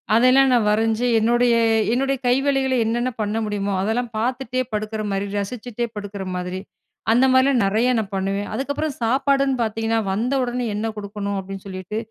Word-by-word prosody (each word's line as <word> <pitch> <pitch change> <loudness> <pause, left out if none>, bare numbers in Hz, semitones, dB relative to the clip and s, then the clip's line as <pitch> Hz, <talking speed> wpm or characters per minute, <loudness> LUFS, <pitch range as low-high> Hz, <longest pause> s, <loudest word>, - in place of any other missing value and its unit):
அதெல்லாம் 255 +3 +5
நான் 230 -3 +3
வரைஞ்சு 225 +2 +1
என்னுடைய-என்னுடைய 235 +2 +2
கைவேலைகள 265 +1 +2
என்னென்ன 240 +3 0
பண்ண 210 +1 -1
முடியுமோ, 205 -1 -2
அதெல்லாம் 230 +4 -1
பாத்துட்டே 255 +2 -1
படுக்குற 215 +1 -2
மாரி 195 +1 -1
ரசிச்சிட்டே 235 +3 -3
படுக்குற 205 -1 -6
மாதிரி 180 +1 -4 0.5
அந்த 245 +3 +5
மாரிலாம் 260 -2 +4
நெறையா 225 +6 +2
நான் 200 -2 -5
பண்ணுவேன் 195 +1 -1
அதுக்கப்பறம் 285 +2 -2
சாப்பாடுன்னு 275 +2 +2
பாத்தீங்கன்னா, 225 +1 0
வந்த 235 +7 -1
உடனே 245 0 -2
என்ன 220 +2 -2
கொடுக்கணும் 200 -1 -4
அப்டின்னு 195 +1 -8
சொல்லிட்டு, 185 +2 -6
225 Hz, 145 wpm, -22 LUFS, 205-255 Hz, 0.5 s, அதெல்லாம்